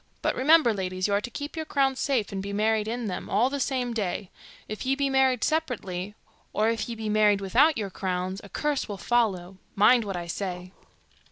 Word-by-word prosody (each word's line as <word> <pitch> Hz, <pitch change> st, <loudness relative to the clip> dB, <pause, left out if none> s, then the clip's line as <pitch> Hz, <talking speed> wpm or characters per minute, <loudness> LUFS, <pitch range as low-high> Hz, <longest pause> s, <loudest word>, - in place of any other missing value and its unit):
But -, -, +2 dB
remember, 285 Hz, -2 st, +5 dB
ladies, 185 Hz, -1 st, -2 dB
you 200 Hz, -, -1 dB
are 200 Hz, -, +2 dB
to 240 Hz, -, -6 dB
keep 290 Hz, +5 st, -6 dB
your 320 Hz, -, -2 dB
crows 270 Hz, -3 st, 0 dB
safe, 255 Hz, -8 st, 0 dB
and 195 Hz, -1 st, -3 dB
be 200 Hz, +1 st, -5 dB
married 215 Hz, +1 st, +1 dB
in 235 Hz, +1 st, -3 dB
them, 185 Hz, -4 st, -4 dB
all 235 Hz, +7 st, +2 dB
the 280 Hz, -, -2 dB
same 255 Hz, -3 st, -1 dB
day. 200 Hz, -3 st, -3 dB, 0.4 s
If 215 Hz, -, -5 dB
you 270 Hz, +1 st, 0 dB
be 280 Hz, -1 st, 0 dB
married 265 Hz, -3 st, +3 dB
separately, 210 Hz, -, -2 dB, 0.4 s
or 215 Hz, +2 st, +2 dB
if 230 Hz, 0 st, -3 dB
you 235 Hz, -, -4 dB
be 220 Hz, -1 st, -5 dB
married 210 Hz, -1 st, +3 dB
without 255 Hz, +11 st, +3 dB
your 205 Hz, -3 st, -3 dB
crowns, 185 Hz, +1 st, -3 dB
a 200 Hz, -, -11 dB
curse 295 Hz, -1 st, -1 dB
will 205 Hz, -, -4 dB
follow 190 Hz, -6 st, 0 dB, 0.2 s
mind 235 Hz, +4 st, +5 dB
what 195 Hz, -3 st, -4 dB
I 175 Hz, -, -4 dB
say. 180 Hz, 0 st, -5 dB
215 Hz, 210 wpm, -26 LUFS, 195-260 Hz, 0.4 s, remember